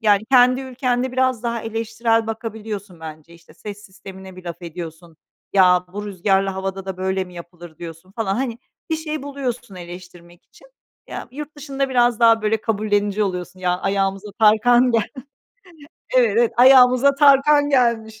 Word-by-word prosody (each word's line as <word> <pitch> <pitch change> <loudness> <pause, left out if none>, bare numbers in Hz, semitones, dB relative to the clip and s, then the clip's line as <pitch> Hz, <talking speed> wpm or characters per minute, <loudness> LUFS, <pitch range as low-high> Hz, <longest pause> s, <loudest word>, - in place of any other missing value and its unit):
Yani, 210 -2 +3
kendi 255 0 +5
ülkende 255 -1 -2
biraz 255 -2 0
daha 235 -1 -2
eleştirel 225 0 -1
bakabiliyorsun 215 -5 -6
bence. 155 +1 -10
İşte, 165 - -19
ses 210 0 -9
sistemine 190 -1 -12
bir 185 - -12
laf 170 +1 -7
ediyorsun, 170 -1 -9 0.4
"Ya, 180 -2 +4
bu 205 +1 -5
rüzgârlı 195 0 0
havada 190 0 -5
da 190 -1 -5
böyle 190 0 -2
mi 180 -1 -15
yapılır?" 170 -1 -12
diyorsun 170 +2 -10
falan. 200 -3 -2
Hani, 240 -1 -3 0.3
bir 320 - +1
şey 310 -2 -5
buluyorsun 255 -6 -5
eleştirmek 175 -1 -12
için. - - -21 0.4
Ya, - - -7
yurt 300 +3 -9
dışında 275 -2 -3
biraz 245 -3 +2
daha, 230 -1 +5
böyle, 215 0 0
kabullenici 205 -1 0
oluyorsun. 185 -1 -4
"Ya, 180 0 0
ayağımıza 195 +1 -1
Tarkan 240 +4 +4
gel 230 -2 +2 1.1
Evet, 235 -5 +4
evet, 235 -1 +2
ayağımıza 255 +1 +6
Tarkan 290 +1 +4
gelmiş. 225 -4 +1
215 Hz, 155 wpm, -20 LUFS, 185-245 Hz, 1.1 s, ayağımıza